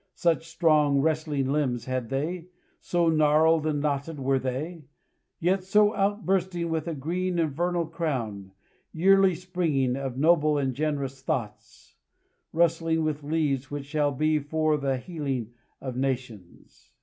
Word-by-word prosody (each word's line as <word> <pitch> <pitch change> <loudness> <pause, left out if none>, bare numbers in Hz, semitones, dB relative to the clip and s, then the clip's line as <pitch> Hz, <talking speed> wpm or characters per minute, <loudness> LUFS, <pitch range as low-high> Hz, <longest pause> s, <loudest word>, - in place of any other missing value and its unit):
Such 165 -1 +1
strong, 155 -4 +3
wrestling 150 -3 0
limbs 135 -5 0
had 130 -2 -3
they, 165 +6 -3 0.3
so 175 -1 0
gnarled 155 0 +4
and 150 -2 0
knotted 145 +1 -2
were 135 0 +1
they, 145 +5 -4 0.5
yet 185 +2 +1
so 210 +2 +4
outbursting 190 -4 0
with 160 0 -2
a 165 - -2
green 175 +5 -2
and 160 -3 +1
vernal 175 +3 -1
crown, 120 - -3 0.4
yearly 190 +2 +4
springing, 160 -8 0
of 135 -2 -4
noble 155 0 +3
and 135 -2 0
generous 140 -2 -2
thoughts, 115 -6 -5 0.5
rustling 165 -1 +1
with 155 -1 -2
leaves 145 -3 -1
which 145 -1 -5
shall 145 0 0
be 155 +3 +1
for 155 +1 0
the 135 -2 -1
healing 135 -6 -4 0.3
of 130 -2 -6
nations. 125 -8 -5
155 Hz, 135 wpm, -26 LUFS, 135-170 Hz, 0.5 s, gnarled